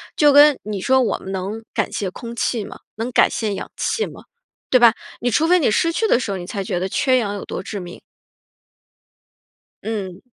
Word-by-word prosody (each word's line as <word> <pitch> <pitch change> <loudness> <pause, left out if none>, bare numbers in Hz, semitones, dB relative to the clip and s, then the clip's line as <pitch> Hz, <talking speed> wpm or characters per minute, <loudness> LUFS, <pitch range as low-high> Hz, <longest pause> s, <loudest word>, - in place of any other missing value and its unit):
就 295 -1 +5
跟 290 0 +7
你 210 -1 -4
说 260 +3 +3
我 235 - 0
们 190 - -8
能 195 +4 -4
感 - - -1
谢 195 -3 -3
空 235 +4 -8
气 230 -2 -1
吗？ - - -10 0.2
能 230 +3 -3
感 - - +5
谢 215 -3 -2
氧 - - -7
气 445 - -1
吗？ - - -11 0.5
对 255 - +5
吧， 235 -2 +7 0.3
你 245 0 -1
除 310 +9 +2
非 360 +2 +5
你 265 - +2
失 335 +9 +2
去 445 +6 0
的 245 - +3
时 235 - -4
候 195 - -2
你 175 - -7
才 195 +1 -4
觉 175 - -2
得 185 - -1
缺 255 +6 +2
氧 205 -4 -1
有 200 - -5
多 190 - -5
致 205 - -5
命。 175 -1 -9 1.8
嗯。 195 -4 -5
225 Hz, 230 characters per minute, -20 LUFS, 195-260 Hz, 1.8 s, 跟